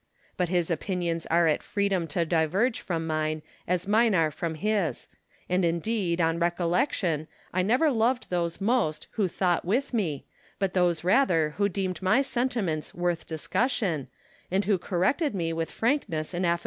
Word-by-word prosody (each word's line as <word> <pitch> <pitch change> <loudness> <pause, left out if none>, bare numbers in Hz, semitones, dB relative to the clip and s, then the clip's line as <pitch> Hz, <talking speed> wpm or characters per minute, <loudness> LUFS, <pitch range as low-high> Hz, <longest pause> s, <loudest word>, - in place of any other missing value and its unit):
But 180 -2 0
his 175 -2 +1
opinions 170 0 -2
are 170 +1 +3
at 155 -2 +2
freedom 195 -4 0
to 165 +3 0
diverge 180 +9 +1
from 165 -3 -2
mine, 155 -1 -1 0.2
as 180 +1 0
mine 220 0 +4
are 160 -3 +3
from 160 +2 -3
his; 190 - -1 0.4
and 180 +1 +1
indeed, 170 +1 0
on 165 0 +2
recollection, 175 - 0 0.3
I 185 - +2
never 250 - +3
loved 240 0 +1
those 170 -2 -1
most 200 -8 +1
who 205 -3 0
thought 175 0 0
with 250 +10 0
me, 165 - -1 0.3
but 195 -2 -1
those 175 -3 +2
rather 180 - +3
who 200 0 +2
deemed 185 -2 -3
my 190 +9 +3
sentiments 240 - -2
worth 175 -1 -1
discussion, 165 - -1 0.4
and 195 +3 +1
who 195 -2 +2
corrected 205 - 0
me 165 -3 -1
with 165 -1 -2
frankness 220 - -1
and 180 +1 0
afi'ability. 170 0 +2
180 Hz, 160 wpm, -27 LUFS, 165-205 Hz, 0.4 s, mine